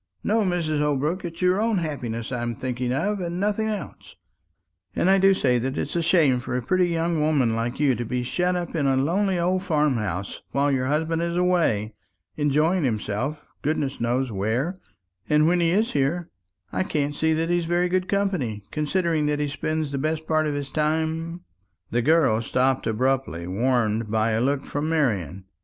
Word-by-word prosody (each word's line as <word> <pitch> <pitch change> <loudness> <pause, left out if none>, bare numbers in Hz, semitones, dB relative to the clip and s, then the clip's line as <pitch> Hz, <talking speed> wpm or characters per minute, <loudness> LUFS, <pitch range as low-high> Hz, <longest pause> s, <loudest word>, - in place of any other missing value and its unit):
No, 220 +2 +2
Mrs. 170 -6 0
Holbrook; 150 +5 0
it's 170 +1 -5
your 180 +3 +3
own 225 -2 +1
happiness 125 -9 -3
I'm 120 -2 -2
thinking 125 0 -3
of, 195 +10 0
and 175 0 -3
nothing 210 +2 0
else. 205 -9 -6 0.8
And 190 - +3
I 195 - +5
do 195 +1 +6
say 125 -8 +2
that 130 +2 -3
it's 145 - -3
a 170 - +2
shame 160 -7 +3
for 125 0 -3
a - - -1
pretty 180 +5 +2
young 165 -1 0
woman 140 -7 +2
like 115 +3 -2
you 145 -3 +3
to 120 - -3
be 125 +2 -2
shut 180 +8 0
up 175 -1 -4
in 145 -4 +1
a 135 -1 +2
lonely 185 +7 +1
old 180 +2 +1
farm 150 -7 +1
house 100 -3 -4
while 140 +1 +2
your 130 -1 0
husband 160 +3 0
is 170 0 -1
away, 165 - +1 0.4
enjoying 155 +4 +2
himself 125 +5 -3
goodness 145 -4 -1
knows 125 +2 0
where; 110 - -1 0.5
and 150 +1 +4
when 175 +1 +3
he 170 -1 +3
is 210 +6 +1
here, 155 +5 -1 0.4
I - - -1
can't 145 -5 -1
see 160 +2 +1
that 165 +1 0
he's 175 -1 +1
very 175 +2 +1
good 185 +1 0
company, 180 - -1
considering 155 0 0
that 150 0 +1
he 150 0 -1
spends 155 +1 -2
the 140 - -2
best 155 +2 -2
part 155 -1 +1
of 145 - -1
his 140 -1 -4
time 160 +3 -1 0.2
" 100 +1 -44
The 120 - +1
girl 140 -6 +3
stopped 130 +3 +1
abruptly, 125 -7 0
warned 110 +2 0
by 110 +1 +1
a 110 +1 +1
look 140 +2 0
from 145 +2 -2
Marian. 95 - 0
150 Hz, 190 wpm, -24 LUFS, 125-170 Hz, 0.8 s, do